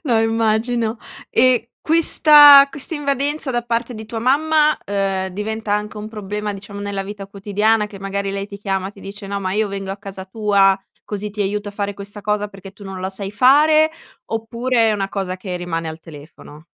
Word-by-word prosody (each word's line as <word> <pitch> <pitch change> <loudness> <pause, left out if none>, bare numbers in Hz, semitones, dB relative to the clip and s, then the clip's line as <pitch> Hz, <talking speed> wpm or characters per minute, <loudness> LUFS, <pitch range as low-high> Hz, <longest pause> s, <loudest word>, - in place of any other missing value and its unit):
No 235 -5 +2
immagino 225 +1 0 0.3
e 245 -1 +3
questa 295 -3 +7
questa 285 +4 -7
invadenza 285 0 -1
da 240 -1 -1
parte 235 +1 -2
di 220 0 -8
tua 225 0 -5
mamma, 305 +4 +3
ehm, 195 -1 -1
diventa 215 +2 -4
anche 210 +1 -2
un 210 +1 -6
problema 210 -1 -4
diciamo 200 +1 -9
nella 200 -1 -3
vita 200 0 -8
quotidiana, 210 +2 0
che 195 - -11
magari 195 0 -3
lei 200 0 -4
ti 200 - -9
chiama 195 -2 -2
e - - -12
ti 200 - -16
dice: 200 +1 -9
"No 200 0 -3
ma 185 -1 -2
io 215 +1 +1
vengo 195 -1 -5
a 195 - -4
casa 195 -2 -9
tua, 195 -1 +2 0.2
così 210 0 -5
ti 210 +1 -7
aiuto 205 +1 -3
a - - -17
fare 200 0 -3
questa 205 +1 -8
cosa, 210 0 -1
perché 195 -1 -12
tu 200 0 -14
non 190 -1 -7
la 190 +1 -3
sai 195 +1 -6
fare"? 305 +7 +5 0.4
Oppure 230 +1 0
è - - +2
una 195 -2 -2
cosa 190 -2 -3
che 185 -1 -5
rimane 165 -2 -3
al 160 +1 -7
telefono? 150 0 -13
205 Hz, 200 wpm, -19 LUFS, 195-230 Hz, 0.4 s, questa